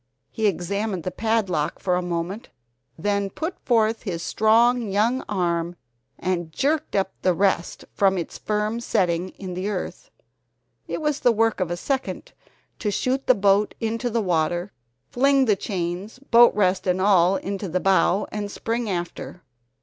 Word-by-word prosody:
He 220 -1 0
examined 200 +1 -2
the 185 - -3
padlock 200 -9 0
for 180 -2 0
a 180 - 0
moment, 175 +6 -4 0.5
then 200 +2 0
put 320 - -5
forth 225 -2 +1
his 170 -5 -4
strong 230 +2 +3
young 230 +6 +1
arm 175 -3 -1 0.4
and 175 -3 -2
jerked 300 - -1
up 195 -1 +1
the 185 -1 +2
rest 190 -2 0
from 195 -1 +3
its 170 - -5
firm 210 +2 -1
setting 180 -5 0
in 185 -1 -8
the 185 +3 -3
earth. 210 - -5 0.8
It - - -4
was 300 -2 0
the 245 - +4
work 225 -1 +1
of 185 -3 -1
a 175 - -2
second 275 - -3 0.5
to 210 - -1
shoot 260 +6 -1
the 255 - +6
boat 200 +1 +2
into 230 +2 -2
the 230 -1 0
water, 175 +1 0 0.4
fling 275 +1 +3
the 215 -4 +3
chains, 185 +2 -4
boat 240 -3 +5
rest 190 -2 +1
and 180 0 +2
all 190 -1 +4
into 195 0 -4
the 185 +3 0
bow, 195 +1 +3
and 205 -1 -4
spring 230 +2 -3
after. 175 0 -5
200 Hz, 160 wpm, -24 LUFS, 180-225 Hz, 0.8 s, the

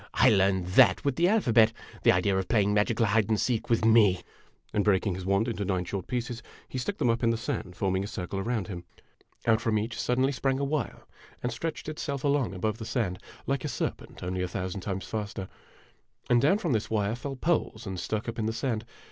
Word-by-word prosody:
"I - - +6
learned 95 -3 +3
that 90 - +5
with 140 -2 +1
the 175 +4 +3
alphabet. 120 - +4 0.3
The - - +6
idea 95 +2 +2
of 95 -1 -1
playing 105 -3 +2
magical 110 +2 +2
hide 110 0 +2
and 110 -2 +2
seek 120 -4 0
with 115 -1 +2
me! 105 -5 +5 0.2
" - - -36
and 105 - +2
breaking 100 -1 +2
his 90 +1 -6
wand 100 +4 +2
into 110 -4 -2
nine 95 -2 -1
short 95 0 -4
pieces, 120 -1 -3 0.3
he 130 - -4
stuck 200 +11 -3
them 120 - +3
up 115 - -1
in 115 - +3
the 115 - +1
sand, 90 -4 -4
forming 95 +1 0
a - - -4
circle 95 0 -4
around 110 -1 -1
him. 90 -3 -6 0.6
Out 110 -1 +3
from 115 -2 +1
each 110 +3 -2
sud 125 - 0
denly 135 +2 +2
sprang 135 0 0
a 140 - -1
wire 140 -3 -2 0.4
and 125 - 0
stretched 160 +7 -4
itself 140 -3 -4
along 140 -8 +1
above 110 +4 -2
the - - -5
sand, 105 -6 -1 0.3
like 140 -1 -1
a - - -1
serpent, 125 - -4
only 90 +1 -2
a 90 - 0
thousand 95 +2 -4
times 95 0 -4
faster; 100 -3 -4 0.8
and 120 -1 +5
down 155 +8 +4
from 175 -7 -2
this 110 -1 -1
wire 105 -1 0
fell 135 +3 -5
poles 130 -6 -1
and 95 -2 -4
stuck 110 +4 -3
up 115 - -4
in 110 - 0
the 110 - -1
sand. 115 -3 -2
110 Hz, 230 wpm, -28 LUFS, 100-125 Hz, 0.8 s, I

